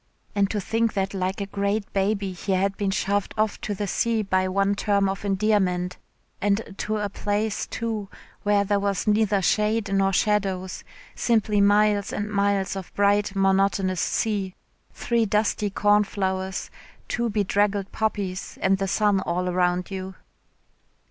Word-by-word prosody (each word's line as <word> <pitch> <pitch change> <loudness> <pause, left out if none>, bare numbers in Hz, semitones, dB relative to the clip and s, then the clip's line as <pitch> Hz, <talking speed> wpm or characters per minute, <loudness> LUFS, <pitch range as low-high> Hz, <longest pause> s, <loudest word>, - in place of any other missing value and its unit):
And 200 -1 +2
to 210 - -1
think 225 +3 0
that 195 -1 -1
like 190 +1 -2
a - - -1
great 200 +2 -1
gaby 195 -1 0
he 190 +2 -2
had 195 +1 +1
been 200 -1 -1
shoved 195 +1 -1
off 215 -1 0
to 205 - -3
the 205 - -2
sea 225 +3 0
by 185 -1 +1
one 195 +1 +1
term 200 -1 +1
of 195 +1 -3
endearment, 190 -3 +1 0.4
and 205 +1 0
to 215 0 -1
a 210 -1 -1
place, 205 +1 -2
too, 220 -4 -3 0.3
where 205 -1 +3
there 200 0 +1
was 200 -1 -1
neither 210 -2 +2
shade 210 +1 +1
nor 195 0 +3
shadows, 190 -2 0 0.3
simply 215 -3 +2
miles 205 0 +3
and 210 +1 -3
miles 200 -1 +1
of 190 -2 -7
bright 205 0 +2
monotonous 195 -1 +2
sea, 200 -4 -1 0.4
three 235 -2 0
dusty 210 0 +1
cornflowers, 195 -2 0 0.4
two 235 -1 -1
bedraggled 205 -1 0
poppies 200 -4 -3
and 195 0 +2
the 195 - -1
sun 205 0 +2
all 180 0 -2
around 180 +1 0
you. 190 0 -5
200 Hz, 150 wpm, -24 LUFS, 190-210 Hz, 0.4 s, where